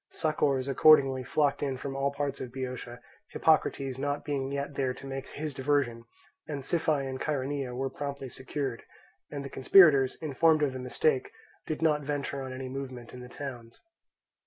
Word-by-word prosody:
Succours 145 -4 0
accordingly 135 -2 +5
flocked 145 +2 +1
in 135 -2 -1
from 135 +1 -5
all 140 +1 0
parts 140 -1 -3
of 125 -2 -6
Boeotia, 125 -2 -6 0.3
Hippocrates 135 -4 +2
not 145 +1 -2
being 140 -2 -2
yet 140 +1 -3
there 130 -2 -1
to 140 - -11
make 135 0 -5
his 150 0 -5
diversion, 130 -4 0 0.4
and 145 -3 -4
Siphae 155 -4 +1
and 130 0 -5
Chaeronea 140 -3 -2
were 135 +2 -1
promptly 140 -2 -5
secured, 130 -1 -4 0.5
and 140 -1 -5
the - - -3
conspirators, 140 -2 +6
informed 155 +1 +3
of 140 -3 +1
the 130 - -5
mistake, 130 +2 0 0.4
did 155 +1 -3
not 150 -2 +3
venture 140 -1 -3
on 130 -1 -5
any 130 0 -5
movement 130 -2 -7
in 125 - -8
the 125 0 -10
towns. 120 -4 -8
135 Hz, 170 wpm, -29 LUFS, 130-145 Hz, 0.5 s, conspirators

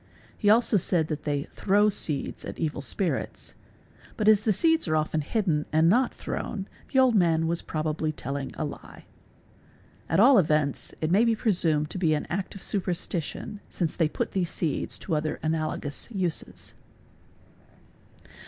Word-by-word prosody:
He 205 - +1
also 225 0 +5
said 165 -3 +1
that 150 -1 -4
they 145 -2 0
"throw" 205 +2 +3
Bihic - - -2
seed 150 -6 -3
at - - -7
evil 155 -3 -2
spirits; 165 +7 -2 0.6
but 215 - 0
as 215 -2 +6
the 215 - +1
seeds 325 - +2
are 155 - +1
often 155 0 0
hidden 160 -3 0
and 160 +1 +4
not 245 +6 +3
thrown, 195 - -4 0.3
bs - - -26
the - - +1
old 260 -2 +5
man 165 -5 +3
was 170 +1 0
probably 155 0 -2
telling 140 -1 -5
a 155 - -2
lie. 145 - -10 1.0
At - - +2
all 245 +2 +7
events 150 -4 0
it 155 +1 0
may 200 +5 +5
be 230 -1 +3
pre 220 0 +1
sumed 155 -5 +1
to 185 - -3
be 160 -4 +2
an 150 - -3
act 190 +3 -3
of 195 - -8
superstition 180 0 -2
since 170 -4 -2
they 160 -3 +2
put - - -3
these 180 -3 -1
seeds 160 -5 -1
to 175 - -5
other 155 0 -1
y 155 - +1
bi 160 - +1
inalogous 155 -2 -3
uses. 185 -7 -4
165 Hz, 180 wpm, -27 LUFS, 155-205 Hz, 1.0 s, all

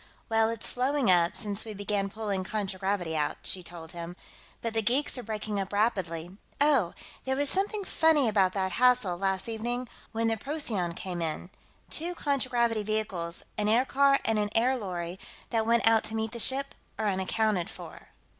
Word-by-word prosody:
"Well, 225 0 +3
it's 230 -1 -3
slowing 260 -3 +2
up, 175 -1 +4
since 205 0 -1
we 220 -2 -7
began 200 0 -1
pulling 200 -2 -2
contragravity 190 -4 -2
out," 150 -1 0
she 185 - 0
told 165 -1 -6
him, 170 0 -7 0.5
"but 230 -1 -2
the 225 - +1
geeks 255 +7 +1
are 250 - -3
breaking 215 -2 -3
up 195 -1 -3
rapidly.... 190 -5 -1 0.2
Oh, 275 - +3 0.3
there 265 0 0
was 285 +1 +2
something 405 +2 0
funny 320 -7 +3
about 195 -4 +3
that 190 -1 0
hassle, 250 -5 +3
last 190 +2 -1
evening, 240 +2 -3 0.2
when 225 0 0
the 225 0 +1
Procyon 220 - -2
came 180 -2 -4
in. 165 +3 -3 0.4
Two 345 +3 -1
contragravity 245 -7 +1
vehicles, 205 -5 -2 0.2
an 210 - +1
aircar 270 +4 +4
and 225 -1 +2
an 205 0 0
air 245 +4 +4
lorry, 180 -5 -4 0.3
that 225 -2 +1
went 230 0 +4
out 225 -1 +5
to 220 - -4
meet 220 0 -1
the 235 - -6
ship, 275 +4 +1 0.2
are 220 - 0
unaccounted 190 -1 0
for." - - -10
215 Hz, 175 wpm, -29 LUFS, 190-245 Hz, 0.5 s, out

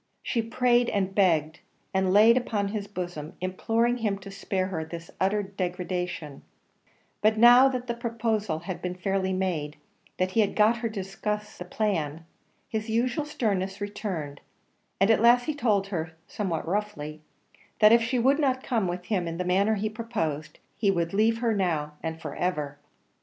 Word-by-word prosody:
She 235 - 0
prayed 240 +1 +2
and 195 -1 -1
begged, 165 -5 +2 0.3
and 190 -1 +2
lay 215 +4 +7
upon 210 -5 0
his 205 -1 -4
bosom 175 -6 -6
imploring 225 +6 0
him 210 -4 -1
to 195 0 -10
spare 195 -1 -2
her 160 -4 -3
this 165 +1 -9
utter 205 +2 +1
degradation; 180 -5 -4 0.8
but 215 +1 +3
now 245 +3 +8
that 250 -2 -3
the 240 - -2
proposal 225 -6 -1
had 185 -1 -5
been 180 0 -3
fairly 190 0 -1
made, 175 -6 -2 0.4
that 185 0 0
he 225 - 0
had 205 -2 +2
got 220 +2 +4
her 235 -1 -2
to 210 -3 -4
discuss 210 +2 -4
the 180 - -8
plan, 165 -6 -2 0.4
his 220 0 -3
usual 245 +6 0
sternness 195 -9 -1
returned; 195 -8 -4 0.6
and 195 +4 +5
at 220 - +3
last 240 +1 +6
he 310 - -1
told 210 -8 +1
her, 165 -4 -3
somewhat 175 -7 -3
roughly, 165 -6 -3 0.6
that 215 0 +7
if 235 - +6
she 240 +3 0
would 270 +5 +3
not 260 -3 +1
come 225 -6 0
with 180 +1 -4
him 185 -5 -1
in 165 0 -4
the 180 - -2
manner 200 +4 +2
he 210 +1 -1
proposed, 215 -10 -3 0.2
he 205 - +2
would 170 -2 0
leave 225 +3 +2
her 230 -2 +2
now 165 -7 -1
and 160 0 -4
for - - -6
ever. 150 -5 -2
200 Hz, 175 wpm, -27 LUFS, 180-225 Hz, 0.8 s, now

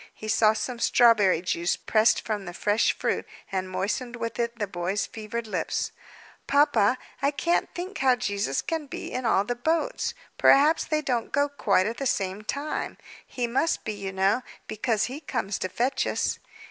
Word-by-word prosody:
He 215 - -8
saw 215 0 +4
some 235 +2 -4
strawberry 210 -9 +4
juice, 175 -1 0
pressed 220 +1 +3
from 210 -3 -2
the 175 0 -7
fresh 210 +3 +2
fruit, - - 0 0.3
and 185 -1 -2
moistened 210 +7 -2
with 230 -1 -4
it 235 0 -1
the 210 - -1
boy's 185 +1 -2
fevered 225 +1 -5
lips. 215 - -2 0.6
"Papa, 255 -5 +4 0.2
I 280 - +3
can't 335 +4 0
think 370 +3 -5
how 260 -2 +4
Jesus 200 - -1
can 320 -3 -3
be - - -6
in 255 -2 -2
all 195 -3 +3
the 245 - -2
boats! 325 - -1 0.2
Perhaps 300 +4 +5
they 305 -1 0
don't 245 -5 -1
go 285 +1 +2
quite 205 -9 +2
at 230 +2 -3
the 275 - -1
same 195 -2 -1
time. 285 +7 -3 0.3
He 250 -2 -2
must 260 +8 0
be, 215 - -2
you 200 -2 -5
know, 195 +5 +2 0.3
because 215 0 0
He 265 +4 -3
comes 225 - -3
to 185 - -2
fetch 255 +6 0
us." - - -1
230 Hz, 180 wpm, -26 LUFS, 200-270 Hz, 0.6 s, Perhaps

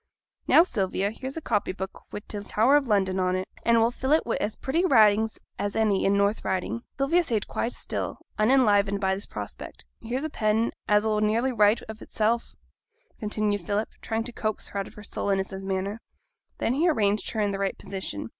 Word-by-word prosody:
'Now, 330 - +7
Sylvia, 200 - -1
here's 265 +6 -6
a - - -3
copy 215 -8 0
book 190 0 -7
wi' 205 - -5
t' 210 - -4
Tower 225 +7 +3
o' - - +6
London 200 -8 +1
on 185 0 +1
it, 185 0 -3
and 235 0 +3
we'll 230 +1 +3
fill 265 +3 0
it 315 - +3
wi' 235 - 0
as 210 +1 -2
pretty 320 +7 0
writing 220 - +5 0.3
as 205 0 -2
any 215 -3 +2
in 195 - +3
t' - - +2
North 200 +2 +1
Riding.' 190 +5 -2 0.2
Sylvia 300 +6 +3
sate 225 -9 -1
quite 235 - -2
still, - - -4 0.2
unenlivened 210 -4 +4
by 190 -1 +1
this 195 +2 -5
prospect. - - -8 0.2
'Here's 245 +5 -3
a 315 - -2
pen 220 0 +1 0.2
as 210 +1 +3
'll 215 -1 +1
nearly 225 +5 +2
write 215 -2 +3
of 220 0 -9
itsel',' 225 +2 0 0.8
continued 210 -2 -1
Philip, 205 +4 -1
still - - -30
trying 225 0 -2
to 240 - -6
coax 215 -2 -2
her 200 - -4
out 195 - -5
her 210 - -12
sullenness 195 -2 -1
of 190 - -5
manner. 195 +3 -3 0.6
Then 230 - 0
he 325 +6 +3
arranged 210 -8 +1
her 220 - -3
in 205 -1 +1
the 195 - -3
right 195 -1 -1
position. 150 - -5
215 Hz, 210 wpm, -26 LUFS, 200-235 Hz, 0.8 s, Now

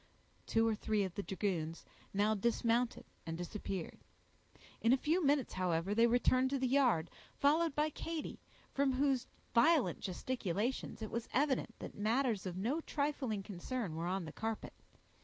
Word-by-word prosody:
Two 225 0 +3
or 225 - +2
three 215 -1 0
of 190 -2 -3
the 200 - -3
dragoons 180 -5 -2 0.3
now 205 +2 +2
dismounted 235 +2 +1 0.2
and 165 0 -4
disappeared; 180 -1 -5 0.8
in 230 +2 +5
a - - +5
few 325 +7 +1
minutes, 280 -2 +2
however, 180 +1 0
they 230 +2 +5
returned 255 +2 +3
to 275 - 0
the 260 - 0
yard, 250 - +3 0.3
followed 305 +1 +3
by 300 +1 +2
Katy, 325 +1 -5 0.3
from 275 -1 +2
whose 265 -1 +1 0.3
violent 305 +5 +4
gesticulations, 220 +3 -2
it 215 - -5
was 235 0 -3
evident 265 -4 +1
that - - -7
matters 220 -1 +1
of 180 0 -4
no 250 - 0
trifling 280 -10 -1
concern 200 0 -4
were 165 +2 -2
on 185 -1 -1
the 155 - -6
carpet. 225 0 -4
230 Hz, 160 wpm, -35 LUFS, 195-270 Hz, 0.8 s, in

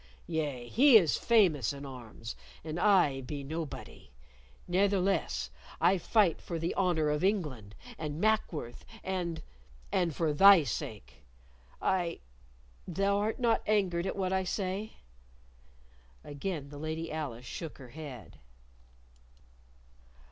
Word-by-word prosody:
Yea, 145 -7 -3
he 255 - +7
is 170 -8 +3
famous 180 - +3
in 140 0 -7
arms, 120 -3 -8 0.3
and 160 +2 -4
I 180 -9 +4
be 140 +2 -6
nobody. 155 - -6 0.6
Ne'theless, 185 - +1 0.3
I 180 +3 +4
fight 195 -2 +2
for 170 - -4
the 165 +2 -2
honor 170 -5 +1
of 150 +3 -1
England 145 - -1 0.2
and 150 -1 -4
Mackworth 180 - 0 0.2
and 175 -3 -3 0.5
and 170 -5 +1
for 160 -3 +1
thy 195 +2 +8
sake. 100 - -6 0.6
I 180 -3 0 0.7
Thou 195 +3 +1
art 215 +2 -1
not 235 -3 +2
angered 190 -4 +1
at - - -2
what 190 -1 -1
I 190 0 +1
say?" 195 +3 -3 1.3
Again 145 0 -5
the 145 0 -9
Lady 160 +2 -4
Alice 135 -6 -5
shook 160 +5 -6
her 130 -3 -12
head. 130 - -9
165 Hz, 120 wpm, -31 LUFS, 140-190 Hz, 1.3 s, thy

